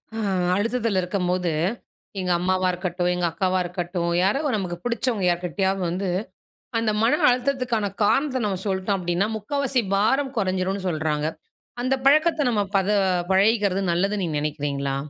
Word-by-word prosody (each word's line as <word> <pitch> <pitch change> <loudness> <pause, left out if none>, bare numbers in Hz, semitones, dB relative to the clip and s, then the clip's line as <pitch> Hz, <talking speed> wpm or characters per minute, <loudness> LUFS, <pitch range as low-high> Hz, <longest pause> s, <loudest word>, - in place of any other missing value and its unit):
அ - - -3 0.4
அழுத்தத்தில 225 -1 0
இருக்கும்போது, 180 -1 -1 0.7
எங்க 180 -1 -1
அம்மாவா 185 +1 +1
இருக்கட்டும், 180 0 -2
எங்க 180 0 -1
அக்காவா 185 +1 0
இருக்கட்டும், 175 0 -3
யாரோ! 205 +9 +2
நமக்கு 180 -4 -3
பிடிச்சவங்க 235 -4 0
யார்க்கிட்டயாவது 180 +2 0
வந்து 185 +2 -2 0.7
அந்த 225 -1 +1
மன 230 - +3
அழுத்தத்துக்கான 245 -4 0
காரணத்த 255 +4 +2
நம்ம 190 -3 -2
சொல்ட்டோம் 190 +1 0
அப்பிடின்னா, 180 +2 0
முக்காவாசி 260 +3 -1
பாரம் 265 +7 +1
குறைஞ்சிருன்னு 190 0 -1
சொல்றாங்க. 155 -2 -1 0.6
அந்த 255 +2 +1
பழக்கத்த 310 +3 +4
நம்ம 210 -3 +1 0.2
பத 195 +1 0 0.4
பழகிக்கிறது 200 0 +3
நல்லதுன்னு 195 +3 0
நீங்க 155 -3 -1
நினைக்கிறீங்களா? 140 -2 -2
195 Hz, 130 wpm, -24 LUFS, 180-225 Hz, 0.7 s, பழக்கத்த